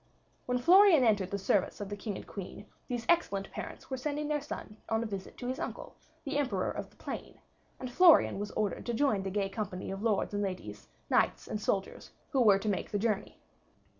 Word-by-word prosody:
When 250 Hz, 0 st, +1 dB
Florian 350 Hz, +2 st, +7 dB
entered 205 Hz, -5 st, +2 dB
the 200 Hz, -, -2 dB
service 195 Hz, 0 st, +1 dB
of 205 Hz, -, -4 dB
the 205 Hz, -, -4 dB
King 205 Hz, 0 st, -5 dB
and -, -, -8 dB
Queen, 200 Hz, +1 st, -8 dB, 0.2 s
these 240 Hz, -2 st, -3 dB
excellent 200 Hz, -, +1 dB
parents -, -, -8 dB
were 260 Hz, -, -1 dB
sending 295 Hz, +3 st, -2 dB
their 300 Hz, -1 st, 0 dB
son 215 Hz, -6 st, -7 dB
on 225 Hz, 0 st, +1 dB
a -, -, -3 dB
visit 195 Hz, -3 st, -6 dB
to 245 Hz, -, -5 dB
his 260 Hz, +1 st, -3 dB
uncle, -, -, -5 dB, 0.3 s
the 285 Hz, +1 st, -1 dB
Emperor 220 Hz, -10 st, 0 dB
of -, -, -6 dB
the -, -, -25 dB
Plain, -, -, -7 dB, 0.4 s
and 255 Hz, -1 st, -5 dB
Florian 335 Hz, -, +6 dB
was 205 Hz, 0 st, -3 dB
ordered 210 Hz, +2 st, -2 dB
to 240 Hz, -, -1 dB
join 225 Hz, -6 st, +2 dB
the 190 Hz, -, -3 dB
gay 200 Hz, 0 st, 0 dB
company 195 Hz, -2 st, -4 dB
of 195 Hz, +1 st, -5 dB
lords 215 Hz, -2 st, +1 dB
and 205 Hz, -, 0 dB
ladies, 145 Hz, -, -5 dB, 0.2 s
knights -, -, +2 dB
and 210 Hz, -, -4 dB
soldiers, 195 Hz, -2 st, -2 dB, 0.2 s
who 270 Hz, -4 st, +2 dB
were 205 Hz, -4 st, +6 dB
to 200 Hz, -, -5 dB
make 200 Hz, -, -1 dB
the 205 Hz, -, -1 dB
journey. 210 Hz, -1 st, -1 dB
215 Hz, 215 wpm, -31 LUFS, 195-255 Hz, 0.4 s, Florian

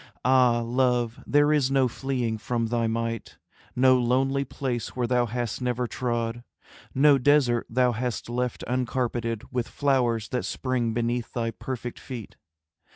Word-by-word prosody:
Ah, 125 Hz, -2 st, +4 dB
Love, 120 Hz, 0 st, 0 dB
there 145 Hz, +1 st, +4 dB
is 140 Hz, -4 st, +2 dB
no 135 Hz, -1 st, +3 dB
fleeing 120 Hz, -3 st, -2 dB
from 115 Hz, +1 st, -1 dB
thy 115 Hz, 0 st, 0 dB
might, 115 Hz, 0 st, -3 dB, 0.4 s
No 130 Hz, 0 st, +5 dB
lonely 135 Hz, +3 st, +1 dB
place 125 Hz, -3 st, -4 dB
where 125 Hz, -1 st, 0 dB
thou 120 Hz, 0 st, +2 dB
hast 120 Hz, +1 st, -3 dB
never 125 Hz, 0 st, -1 dB
trod, 120 Hz, -1 st, -2 dB, 0.5 s
No 140 Hz, +1 st, +5 dB
desert 125 Hz, -3 st, +3 dB
thou 125 Hz, +1 st, +3 dB
hast 120 Hz, +1 st, -3 dB
left 125 Hz, +1 st, -2 dB
uncarpeted 120 Hz, -2 st, -1 dB
With 125 Hz, -2 st, -1 dB
flowers 125 Hz, -6 st, +1 dB
that 125 Hz, -, -2 dB
spring 120 Hz, -4 st, -1 dB
beneath 120 Hz, 0 st, -1 dB
thy 115 Hz, -1 st, -1 dB
perfect 120 Hz, 0 st, -6 dB
feet. 120 Hz, -5 st, -8 dB
125 Hz, 145 wpm, -26 LUFS, 115-130 Hz, 0.5 s, No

